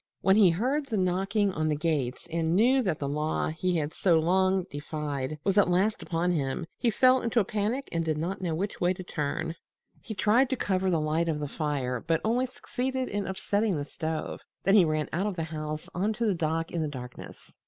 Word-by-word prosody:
When 190 0 +4
he 205 -4 +7
heard 260 - 0
the 225 -5 -1
knocking 195 +2 +1
on 155 -3 -1
the 150 - +1
gates 145 -5 -1
and 165 0 +1
knew 250 +6 +4
that 185 -10 0
the 140 - -3
law 150 +2 -1
he 170 +3 0
had 150 -1 -2
so 175 -4 +3
long 185 +2 +2
defied 145 -1 -4
was 195 +1 +3
at 200 - +4
last 195 +5 +2
upon 175 +1 0
him, 145 0 -1
he 240 - +2
fell 255 +3 +4
into 230 0 +1
a 205 - +2
panic 215 +7 -1
and 165 -1 0
did 155 -2 -1
not 175 +5 -3
know 170 -3 -1
which 195 +5 -3
way 175 +1 +3
to 185 - -8
turn. 160 0 -3 0.5
He 220 - -7
tried 230 +7 +3
to 260 - +1
cover 190 -5 0
the 170 -3 +2
light 155 +2 0
of 155 -2 -1
the 145 - -3
fire, 140 -5 -2
but 165 +2 0
only 245 +4 +2
succeeded 260 0 -3
in 205 -1 -2
upsetting 200 0 0
the 145 - -3
stove. 160 +1 -4 0.2
Then 195 - +3
he 200 -4 +7
ran 155 -1 0
out 190 +5 0
of 205 - -3
the 165 - -2
house 155 -1 -5
on 200 +5 0
to 230 +2 -2
the 210 - +3
dock 165 -1 -1
in 170 - -1
the 155 - 0
darkness. 125 -4 -9
175 Hz, 225 wpm, -28 LUFS, 155-205 Hz, 0.5 s, he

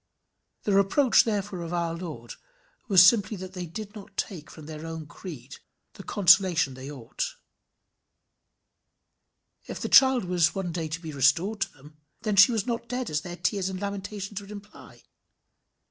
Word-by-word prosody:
The 205 - 0
reproach 200 +7 +4
therefore 205 -4 -2
of 170 0 -6
our 170 -1 -1
Lord 155 -9 -7 0.5
was 185 -4 +8
simply 205 +1 +3
that 185 0 -8
they 180 -2 -5
did 205 +4 -8
not 200 -2 -12
take 170 -7 -4
from 155 - -12
their 155 0 -8
own 160 -1 -6
creed 145 -4 -10 0.4
the - - -11
consolation 180 -7 +4
they 130 +2 -9
ought. 145 - -5 2.3
If - - -6
the - - -4
child 260 -5 +6
was 175 -2 +3
to - - -7
be - - -23
one 190 -3 -3
day 165 -2 -4
restored 165 +8 +1
to 195 - -1
them, 145 +2 -17 0.3
then 215 -2 0
she 200 +4 +8
was 225 -3 -1
not 235 -1 -4
dead 250 -4 -3
as 150 0 0
their 175 +2 -8
tears 195 -1 -1
and 185 -1 -5
lamentations 200 0 -5
would 200 - -13
imply. 205 0 -12
185 Hz, 165 wpm, -26 LUFS, 160-205 Hz, 2.3 s, was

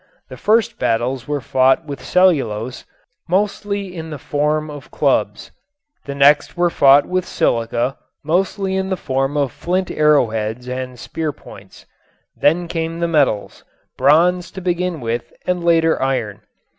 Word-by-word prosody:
The - - -8
first 220 0 +1
battles 120 +2 -1
were 145 -1 -2
fought 130 +4 +2
with 140 -2 -7
cellulose, 130 - +1 0.4
mostly 200 0 -1
in 160 -1 -6
the 150 - -6
form 150 +3 -1
of 145 -1 -10
clubs. - - 0 0.5
The 140 - -5
next 145 +4 +4
were 175 0 +2
fought 140 -1 +5
with 185 0 -1
silica, 120 -3 -1 0.2
mostly 190 +4 0
in 190 0 -1
the 190 - -1
form 135 0 -1
of 140 -4 0
flint 185 +6 -2
arrowheads 125 -6 +1
and 125 0 -5
spear 155 +5 -4
points. - - -15 0.5
Then 170 +4 +2
came 165 0 -3
the 170 - 0
metals, 145 -10 0 0.3
bronze 170 +6 +3
to - - -6
begin 175 -3 -2
with 120 +1 -3
and 180 -1 -1
later 165 -1 +3
iron. 110 -6 -2
150 Hz, 145 wpm, -19 LUFS, 130-175 Hz, 0.5 s, fought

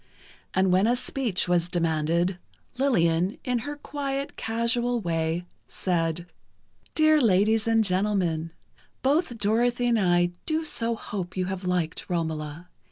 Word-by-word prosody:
And 190 0 +3
when 190 +4 +4
a 240 - +3
speech 245 -7 0
was 175 -1 +1
demanded, 170 +2 0 0.4
Lillian, 180 -8 +2
in 250 -2 0
her 290 +6 -5
quiet, 280 -1 -4
casual 235 +2 0
way, 165 -2 -1 0.2
said: 170 -2 -1 0.7
"Dear 310 -1 +5
ladies 215 +1 +3
and 225 -1 +4
gentlemen, 185 -5 0 0.5
both 275 -2 +1
Dorothy 235 +4 +1
and 235 -2 +3
I 175 -2 +3 0.2
do 315 0 +1
so 230 -6 0
hope 190 -5 -6
you 185 - 0
have 190 0 -4
liked 180 -3 -2
'Romola. 160 -1 -3
190 Hz, 130 wpm, -26 LUFS, 175-240 Hz, 0.7 s, Dear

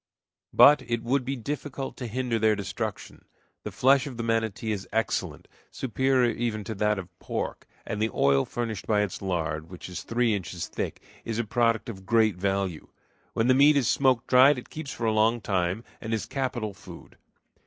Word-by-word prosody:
But 145 -1 +7
it 120 -1 -1
would 130 +3 +1
be 135 +2 -2
difficult 135 +2 -5
to 125 - -5
hinder 120 0 -1
their 110 0 +3
destruction. 100 -3 -5 0.4
The - - -6
flesh 135 +2 +3
of 130 -4 -7
the 115 - -3
manatee 115 -1 -1
is 100 -2 -4
excellent, 110 +1 -2 0.2
superior 130 0 +1
even 115 -3 -2
to 110 - -5
that 105 0 +1
of 90 -2 -9
pork, - - -4 0.2
and 105 - -4
the 110 - +2
oil 70 -4 +3
furnished 115 -5 -4
by 105 -1 +3
its 105 -3 -3
lard, 80 -4 -2
which 90 -1 -9
is 90 - -6
three 120 -1 +1
inches 95 -4 -4
thick, - - -5 0.2
is 115 -2 -3
a 120 - +1
product 115 0 +1
of 95 -4 -8
great 110 -4 +3
value. 95 -3 -2 0.5
When 115 - +1
the 130 - +5
meat 145 +3 +6
is 130 -5 +2
smoke 130 -3 +2
dried 130 +2 +6
it 125 - -9
keeps 155 -2 -6
for 115 - -4
a 110 - +2
long 110 +2 +3
time, 95 0 -1 0.2
and 110 0 -2
is 110 - -3
capital 120 -6 -3
food. - - -13
115 Hz, 190 wpm, -27 LUFS, 100-125 Hz, 0.5 s, But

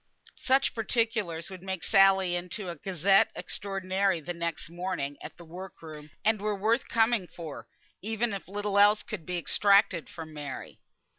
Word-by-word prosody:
Such 270 +1 +2
particulars 215 -7 -1
would 185 -2 -9
make 190 -3 -4
Sally 190 +1 +5
into 180 +2 -4
a - - -7
Gazette 190 +4 +3
Extraordinary 195 -1 -1
the 160 +3 -5
next 170 -1 -3
morning 170 -4 -3
at - - -9
the 170 - -12
work 180 +3 -9
room, 150 -1 -10 0.2
and 215 -1 +3
were 210 0 0
worth 225 +5 +1
coming 225 -4 +2
for, 165 -5 -9 0.3
even 220 +2 -1
if 195 - -6
little 205 +1 -1
else 205 +1 +5
could 185 -8 -7
be 180 0 -2
extracted 200 0 +3
from 160 -2 -9
Mary. 145 -3 -7
190 Hz, 160 wpm, -29 LUFS, 170-205 Hz, 0.3 s, Sally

